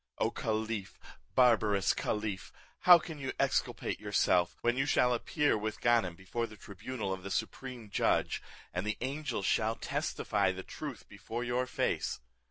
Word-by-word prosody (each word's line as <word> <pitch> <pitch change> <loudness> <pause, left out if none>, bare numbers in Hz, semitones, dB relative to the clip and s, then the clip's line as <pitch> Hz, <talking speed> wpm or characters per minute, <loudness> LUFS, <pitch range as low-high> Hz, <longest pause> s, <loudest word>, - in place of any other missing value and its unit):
O - - +1
caliph, 110 -2 -2 0.4
barbarous 110 -6 +4
caliph, 105 -2 -2 0.4
how 175 - +13
can 160 -2 -7
you 135 -1 -3
exculpate - - 0
yourself, 90 -1 +2
when 120 0 +2
you 135 +2 +1
shall 125 -3 +4
appear 145 +5 +1
with 110 0 -3
Ganem 115 -7 +3
before 105 +6 -3
the 105 - -13
tribunal 100 +2 -5
of 95 - -6
the 100 - -6
Supreme 125 +3 -4
Judge, - - +1 0.3
and 90 - -1
the 105 0 -2
angels 135 -5 -2
shall 110 +1 +2
testify 100 -4 0
the 95 0 -6
truth 145 -6 -7
before 105 +4 -5
your 125 +1 0
face? - - -1
110 Hz, 155 wpm, -32 LUFS, 100-125 Hz, 0.4 s, how